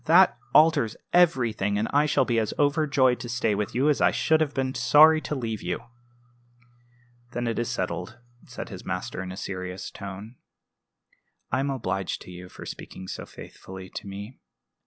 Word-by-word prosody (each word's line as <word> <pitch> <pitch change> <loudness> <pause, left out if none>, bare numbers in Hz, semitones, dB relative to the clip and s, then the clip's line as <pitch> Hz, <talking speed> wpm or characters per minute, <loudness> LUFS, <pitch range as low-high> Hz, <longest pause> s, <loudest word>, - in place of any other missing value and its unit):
"That 180 +4 +6 0.2
alters 155 -7 +5 0.2
everything; 120 - +3
and 110 +2 0
I 145 +2 +4
shall 140 -3 +3
be 120 -2 +1
as 110 - -2
overjoyed 145 -4 +3
to 120 - -6
stay 115 -2 +1
with 105 +1 -2
you 135 +4 +2
as 150 - +2
I - - +6
should 160 0 +2
have 150 -2 +1
been 130 -1 0
sorry 155 +3 +6
to 150 - -3
leave 115 -5 -3
you." 90 0 -2 1.5
"Then 120 - -2
that 115 -1 -1
is 120 - -1
settled," - - -3 0.3
said - - -7
his - - -8
master, - - -4
in 95 -1 -6
a 90 - -8
serious 95 -2 -5
tone. 100 +5 -8 1.1
"I 130 - +1
am 140 +1 0
obliged 95 -8 -2
to - - -11
you 90 0 -10
for - - -10
speaking 95 - -8
so - - -6
faithfully 95 0 -10
to - - -7
me. 100 +5 -8
120 Hz, 180 wpm, -26 LUFS, 100-145 Hz, 1.5 s, That